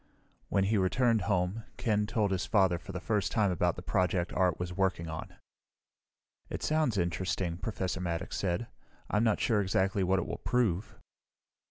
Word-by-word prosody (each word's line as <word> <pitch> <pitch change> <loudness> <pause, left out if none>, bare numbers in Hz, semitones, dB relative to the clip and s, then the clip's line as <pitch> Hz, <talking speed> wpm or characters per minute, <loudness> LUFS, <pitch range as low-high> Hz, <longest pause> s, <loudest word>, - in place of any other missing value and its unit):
When 95 - +2
he 105 +2 +2
returned 115 +4 +2
home 95 +3 0
Ken 105 -2 +1
told 105 -2 +1
his 90 -3 -1
father 95 -5 +3
for - - -9
the 90 - -4
first 105 +1 0
time 105 -4 +2
about 90 -1 +1
the 90 - -8
project 90 -2 0
Art 90 -3 +2
was 90 0 -3
working 95 -3 0
on. 80 0 -6 1.1
"It - - -5
sounds 155 -8 +1
interesting," 85 0 -1
Professor 95 -3 -3
Maddox 85 -2 -3
said. 95 +4 -1 0.5
"I'm 105 +1 +3
not 110 -3 +2
sure 110 -4 +2
exactly 95 +1 +1
what 95 +1 +2
it 95 - -1
will - - -5
prove." 110 -6 0
95 Hz, 170 wpm, -31 LUFS, 90-105 Hz, 1.1 s, father